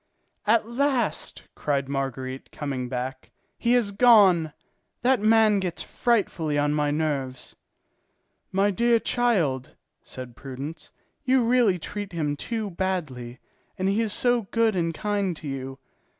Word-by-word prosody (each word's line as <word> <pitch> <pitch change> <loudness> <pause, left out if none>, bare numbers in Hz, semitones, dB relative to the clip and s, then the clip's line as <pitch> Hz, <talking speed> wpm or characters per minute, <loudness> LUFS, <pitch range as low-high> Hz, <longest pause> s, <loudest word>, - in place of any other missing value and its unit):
"At 220 0 +3
last," 250 -1 -1
cried 140 -2 -1
Marguerite, 135 -1 -4
coming 135 -4 -4
back, 130 +1 -5 0.3
"he 235 0 +1
has 235 -5 +2
gone! 195 -8 +5 0.5
That 260 0 +4
man 215 -1 +4
gets 180 -3 -3
frightfully 185 -10 0
on 145 0 +2
my 150 -1 +1
nerves!" 145 -4 -2 1.0
"My 195 +2 +2
dear 235 +4 +3
child," 190 - 0 0.3
said 125 -2 -9
Prudence, 135 +5 -8 0.3
"you 260 -1 +3
really 230 -5 +3
treat 200 +3 -6
him 150 -3 -1
too 215 +5 -4
badly, 155 -10 -3 0.4
and 190 0 0
he 200 +3 +2
is 220 -2 -1
so 245 -2 +1
good 230 -2 +2
and 165 -2 0
kind 200 -1 -2
to 155 - -8
you. 135 -1 -5
185 Hz, 135 wpm, -25 LUFS, 140-225 Hz, 1.0 s, gone